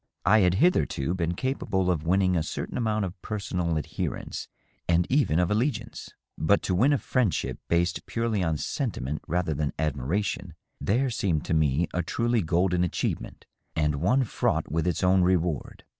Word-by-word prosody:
I 110 - +6
had 90 -2 +3
hitherto 95 - +2
been 85 -1 -1
capable 95 -7 0
of 80 -2 -2
winning 95 0 +3
a 85 - +2
certain 75 - -4
amount 110 -4 0
of 90 0 -8
personal 90 -6 -2
adherence 75 - -4 0.4
and 85 0 +4
even 135 - +3
of 90 0 +2
all^iance, 120 +7 -2 0.3
but 100 +6 +3
to 95 - 0
win 120 +11 +4
a 145 - +4
friendship 120 - -1
based 85 +1 0
purely 115 -3 -1
on 80 -3 0
sentiment 75 - -3
rather 90 -1 0
than 75 0 -2
admiration, 75 +7 -2
— - - -39
there 125 +5 +2
seemed 90 -9 0
to - - -1
me 80 +1 +2
a 90 - +1
truly 120 +6 0
golden 90 +1 +1
achievement, 90 - -3 0.3
and 75 -1 +1
one 125 +10 +3
fraught 110 - -1
with 80 +1 0
its 90 - 0
own 95 +1 +4
reward. 90 -4 0
90 Hz, 170 wpm, -27 LUFS, 80-105 Hz, 0.4 s, I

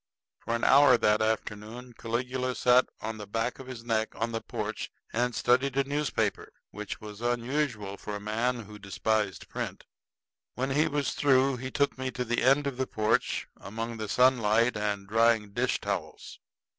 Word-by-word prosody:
For 115 - -2
an 115 - -3
hour 140 -2 +7
that 105 -1 +3
afternoon 110 +2 -3
Caligula 125 +2 -2
sat 125 +1 +4
on 110 0 -4
the 105 - -7
back 115 +4 -2
of 130 - -9
his 125 -3 -8
neck 110 -2 -1
on 115 +1 -2
the 115 -1 -3
porch - - -4 0.2
and 120 +1 0
studied 130 +2 +2
a 140 - +4
newspaper, 145 +1 -1 0.2
which 105 -1 -6
was 105 0 -10
unusual 120 -3 -1
in 105 - -2
a - - -4
man 115 +4 -1
who 105 -1 -11
despised 100 -2 -1
print. - - -5 0.7
When 130 +2 -1
he 150 +3 +3
was 145 -1 -1
through 135 -2 +3
he 130 +1 -5
took 140 0 0
me 130 0 -1
to 125 - -1
the 120 0 0
end 135 +3 +4
of 140 -3 -3
the 130 0 -1
porch 110 +1 0
among 115 +2 -5
the 110 -1 -5
sunlight 120 -1 +3
and 105 -2 -2
drying 115 -1 +3
dish - - 0
towels. - - -5
115 Hz, 175 wpm, -29 LUFS, 110-130 Hz, 0.7 s, hour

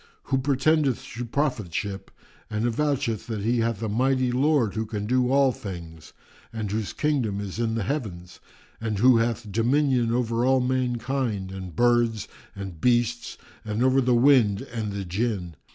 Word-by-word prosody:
[FN#359] - - -21
who 135 - +4
pretendeth 140 0 +1
to 120 +1 -4
prophetship 105 - -2 0.4
and 110 +2 -1
avoucheth 125 -2 -1
that 110 -3 -3
he 120 +2 +1
hath 115 -1 -1
a - - 0
mighty 130 +3 +1
Lord 130 -4 +2
who 110 0 -3
can 105 -1 -4
do 125 +2 +1
all 135 -1 +4
things 85 -8 -9 0.4
and 110 -3 -4
whose 110 -1 -2
kingdom 130 -10 0
is 100 +1 -5
in 115 -1 0
the 115 - -1
Heavens 95 - -4 0.4
and 110 -2 -2
who 125 +3 +6
hath 115 -2 -1
dominion 125 +2 +2
over 120 -1 0
all 130 +1 +4
mankind 125 -5 -1
and 95 -4 -7
birds 120 -3 +2 0.3
and 95 -5 -7
beasts 120 -1 +1 0.3
and 110 +2 -1
over 130 +1 +4
the 125 -1 +2
wind 120 -6 +4
and 110 -3 -3
the 100 -1 -4
Jinn. 95 -3 -2
115 Hz, 165 wpm, -25 LUFS, 105-130 Hz, 0.4 s, who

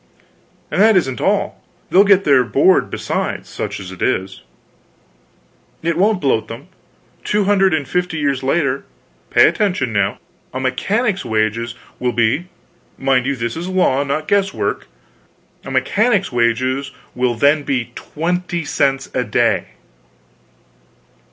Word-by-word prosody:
"And - - +1
that 220 -1 +6
isn't 130 -9 -1
all; - - 0 0.3
they'll 195 - +7
get 200 -1 +4
their 140 -6 +4
board 145 +10 +3
besides - - -3
such - - -5
as 95 -1 -8
it 95 - -11
is: 95 -8 -1 1.4
it 170 0 0
won't 200 +3 +2
bloat 135 -7 0
them. 125 +10 -9 0.5
Two 210 0 +1
hundred 195 -1 +3
and 150 -5 -1
fifty 180 0 -1
years 140 -3 0
later 140 -1 0 0.5
pay - - +6
attention 180 - 0
now 100 -1 0 0.4
a - - -1
mechanic's 195 - 0
wages 110 +2 -1 0.2
will 125 -1 -1
be 120 +9 +1 0.5
mind 130 -1 +1
you, 140 - 0
this 115 -2 -3
is 170 +2 -5
law, 180 -7 +2
not 150 +2 -3
guesswork; 195 -1 0 0.8
a - - -8
mechanic's 210 -4 +1
wages 130 +3 0 0.2
will 125 -1 0
then 145 +5 +3
be 130 -4 -2
twenty 175 +1 -3
cents 135 -1 0
a 125 - 0
day!" 105 - +1
140 Hz, 135 wpm, -18 LUFS, 125-180 Hz, 1.4 s, they'll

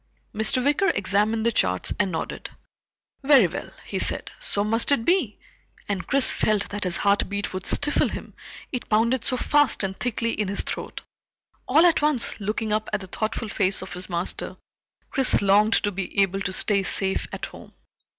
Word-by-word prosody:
Mr. 220 +4 +2
Wicker 295 +7 +2
examined 210 +3 +1
the 235 - +3
charts 90 - 0
and 195 -2 +1
nodded. 160 - -5 0.7
"Very 270 -6 +6
well," 175 +1 -5 0.2
he - - -4
said, - - -1
"so 205 - 0
must 225 +5 +1
it 230 -5 +2
be," 345 - +1 0.5
and 195 -2 -3
Chris 275 -1 +4
felt 210 -2 0
that 205 -1 -4
his 180 -1 +1
heartbeat 200 0 0
would 185 0 -5
stifle 295 +1 +2
him, - - -7 0.4
it 250 - -5
pounded 230 +3 +2
so 255 - 0
fast 290 -3 +2
and 190 0 -4
thickly 230 -1 -1
in 210 -3 -2
his 200 +1 -2
throat. - - -6 0.6
All 310 +6 +5
at 335 -3 +4
once, 295 -7 +1
looking 215 +1 -2
up 215 0 -1
at 210 -1 -1
the - - -6
thoughtful 215 +4 -4
face 190 -2 0
of 190 - -8
his 180 +2 -2
master, 175 0 -4 0.5
Chris 270 -3 +4
longed 205 +2 +3
to 205 - +2
be 195 +1 -4
able 195 0 +1
to 195 - -2
stay 200 +1 +2
safe 190 0 -1
at - - -5
home. - - -13
210 Hz, 180 wpm, -24 LUFS, 195-245 Hz, 0.7 s, Very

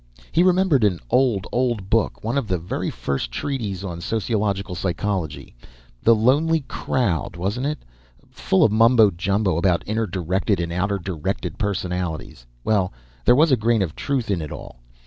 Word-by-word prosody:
He 170 - +3
remembered 180 - +3
an 95 -5 +2
old, 120 -7 +2
old 120 -6 0
book 115 -1 +1
one 115 +4 -1
of 140 -6 0
the 95 - 0
very 85 +2 -3
first 70 -3 -3
treatises 105 - -3
on 85 -3 -5
sociological 100 -3 -1
psychology. 90 -4 -3 0.5
The 115 - +5
Lonely 150 +8 +3
Crowd, 115 - -1
wasn't 100 +10 -2
it? 150 0 -4 0.5
Full 95 - +2
of 110 - +4
mumbo 115 -1 +5
jumbo 95 0 0
about 85 0 +2
"inner 110 +1 -1
directed" 95 +2 -1
and 85 0 -2
"outer 100 +3 0
directed" 90 -1 -4
personalities. 90 -8 -3 0.2
Well, 100 -4 +1 0.3
there - - +6
was 155 +3 +4
a - - +7
grain 115 -2 +2
of 80 -4 -5
truth 130 -6 -2
in 90 -4 0
it 75 - -6
all. - - -9
100 Hz, 165 wpm, -22 LUFS, 90-120 Hz, 0.5 s, a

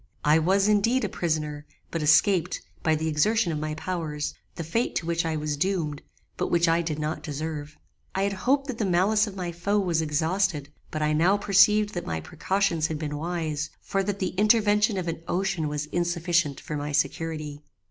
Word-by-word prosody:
I 150 +2 +5
was, 195 +5 +3
indeed, 220 +5 +3
a - - 0
prisoner, 150 -3 -2 0.3
but 165 - -2
escaped, 170 +3 +3 0.2
by 160 -1 +2
the 160 +1 -2
exertion 175 +5 +2
of 155 - -2
my 155 0 -3
powers, 160 -3 -3 0.2
the 165 - -4
fate 225 +10 -1
to 165 - -1
which 170 0 0
I 160 - -1
was 150 -1 -2
doomed, 155 -3 -1 0.4
but - - -1
which 170 0 +3
I 165 +1 +3
did 160 -3 -3
not 155 +1 -3
deserve. 150 0 -5 0.4
I 190 - +1
had 200 0 0
hoped 275 +8 +1
that 260 -5 -5
the - - +1
malice 200 +4 +3
of 200 - -7
my 180 -2 -3
foe 200 +5 -1
was 175 -5 +1
exhausted; 160 0 0 0.2
but 155 0 -2
I 150 0 +2
now 175 +6 +4
perceived 205 +1 +4
that 175 - -4
my 80 -1 -2
precautions 170 - 0
had 160 - -3
been 150 -1 -4
wise, 160 -2 -2
for 195 - -1
that 200 0 -2
the 185 -2 -1
intervention 210 -1 +4
of 180 -2 -3
an 165 -1 -3
ocean 180 -3 0
was 150 0 -3
insufficient 170 -2 0
for 150 - -6
my 145 0 -3
security. 155 0 -2
170 Hz, 200 wpm, -26 LUFS, 155-195 Hz, 0.4 s, I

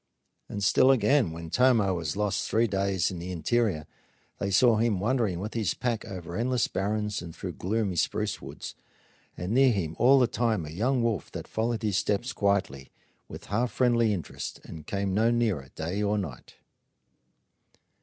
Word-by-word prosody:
And 100 - -4
still 100 +6 +5
again, 130 - +4
when 85 0 -8
Tomah 120 -7 +4
was 85 -1 -3
lost 105 -1 -1
three 115 +2 +3
days 95 -4 0
in 90 - -6
the 90 +2 -5
interior, 90 -2 0 0.5
they 100 - -1
saw 110 +4 +5
him 110 -4 +1
wandering 110 -4 0
with 105 +3 -5
his 110 -7 -1
pack 120 -3 -2
over 90 -2 -7
endless 120 +2 +1
barrens 105 +1 -2
and 85 -2 -9
through - - -5
gloomy 100 -1 -1
spruce - - -1
woods, - - -8 0.6
and 90 +3 -4
near 130 +2 +5
him 85 -7 -2
all 135 +3 +6
the 130 - +5
time 115 -7 0
a 75 - -8
young 120 +8 0
wolf 115 -6 -1
that - - -6
followed 115 +1 -2
his 105 -3 +1
steps 105 +4 -1
quietly, 95 -10 0 0.4
with - - -10
half 120 +3 +1
friendly 120 -3 +2
interest, 90 -8 -5
and 80 -2 -10
came 100 -1 -1
no 110 +4 +3
nearer 110 - 0
day 85 +6 -3
or 105 0 +1
night. 80 -12 -6
105 Hz, 175 wpm, -27 LUFS, 90-115 Hz, 0.6 s, all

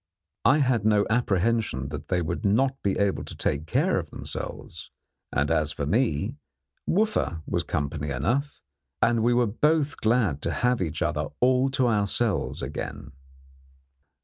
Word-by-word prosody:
I 135 - +6
had 130 -7 +2
no 105 -1 +3
apprehension 110 - +1
that 75 -1 -7
they 90 -2 0
would 80 +1 -3
not 130 +7 +2
be 100 - 0
able 100 -1 0
to - - -9
take 75 +3 -2
care - - +2
of - - -7
themselves; - - -6 0.4
and - - 0
as 75 -1 +2
for 70 - -3
me, 90 - 0 0.5
Wooffa 190 - +1
was - - -1
company 75 0 -3
enough, 120 - -1 0.4
and 115 -1 +3
we 120 +2 +3
were 120 0 +4
both 150 +6 +1
glad 110 - +1
to 85 - -2
have 125 +7 +1
each 80 -1 -2
other 75 -3 -1
all 130 +1 +3
to 130 - +3
ourselves 105 0 0
again. 70 - -6
105 Hz, 150 wpm, -26 LUFS, 80-125 Hz, 0.5 s, I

